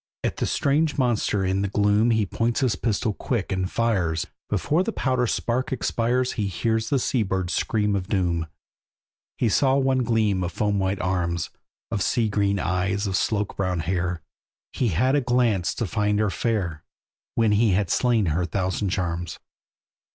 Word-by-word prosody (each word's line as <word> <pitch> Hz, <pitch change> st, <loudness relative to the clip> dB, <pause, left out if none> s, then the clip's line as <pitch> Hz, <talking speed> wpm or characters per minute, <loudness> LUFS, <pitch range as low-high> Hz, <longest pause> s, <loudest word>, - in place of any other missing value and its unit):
At -, -, -1 dB
that -, -, -1 dB
strange 150 Hz, +2 st, +1 dB
monster 115 Hz, -6 st, +1 dB
in 95 Hz, +1 st, 0 dB
the 100 Hz, -, 0 dB
gloom 105 Hz, +3 st, +2 dB
He 110 Hz, -2 st, +2 dB
points 115 Hz, +6 st, -1 dB
his 125 Hz, -4 st, +2 dB
pistol 110 Hz, -1 st, -1 dB
quick, 110 Hz, -2 st, -3 dB
and 95 Hz, -1 st, -1 dB
fires; 95 Hz, -9 st, 0 dB, 0.2 s
Before 155 Hz, +4 st, +1 dB
the 215 Hz, +4 st, -1 dB
powder 130 Hz, -, 0 dB
spark 125 Hz, +6 st, -1 dB
expires 125 Hz, 0 st, 0 dB
He 105 Hz, -3 st, -2 dB
hears 110 Hz, -, -1 dB
a 140 Hz, -, +4 dB
sea 125 Hz, -1 st, 0 dB
bird's 95 Hz, -3 st, -1 dB
scream 105 Hz, -2 st, +1 dB
of 95 Hz, -2 st, -2 dB
doom. 85 Hz, -5 st, 0 dB, 0.9 s
He 120 Hz, -, +1 dB
saw 130 Hz, +4 st, +3 dB
one 135 Hz, -1 st, +2 dB
gleam 110 Hz, -6 st, +1 dB
of 90 Hz, -, -2 dB
foam 105 Hz, -2 st, 0 dB
white 95 Hz, 0 st, 0 dB
arms, 85 Hz, -2 st, -1 dB, 0.4 s
Of 105 Hz, -3 st, -1 dB
sea 115 Hz, +2 st, +1 dB
green 100 Hz, -1 st, +1 dB
eyes, 95 Hz, +3 st, 0 dB
of 95 Hz, -1 st, -1 dB
sloak 105 Hz, +1 st, 0 dB
brown 90 Hz, -3 st, 0 dB
hair; 90 Hz, 0 st, -2 dB, 0.5 s
He 125 Hz, -, 0 dB
had 125 Hz, +8 st, +2 dB
a 145 Hz, -, +3 dB
glance 120 Hz, -7 st, +1 dB
to 115 Hz, -, -1 dB
find 105 Hz, 0 st, 0 dB
her 105 Hz, -2 st, +1 dB
fair, 95 Hz, -11 st, -2 dB, 0.5 s
When 115 Hz, -2 st, +3 dB
he 105 Hz, -1 st, +3 dB
had 95 Hz, -1 st, +1 dB
slain 120 Hz, -4 st, +2 dB
her 90 Hz, +2 st, 0 dB
thousand 95 Hz, +3 st, -1 dB
charms. 85 Hz, -2 st, -2 dB
105 Hz, 175 wpm, -24 LUFS, 95-120 Hz, 0.9 s, a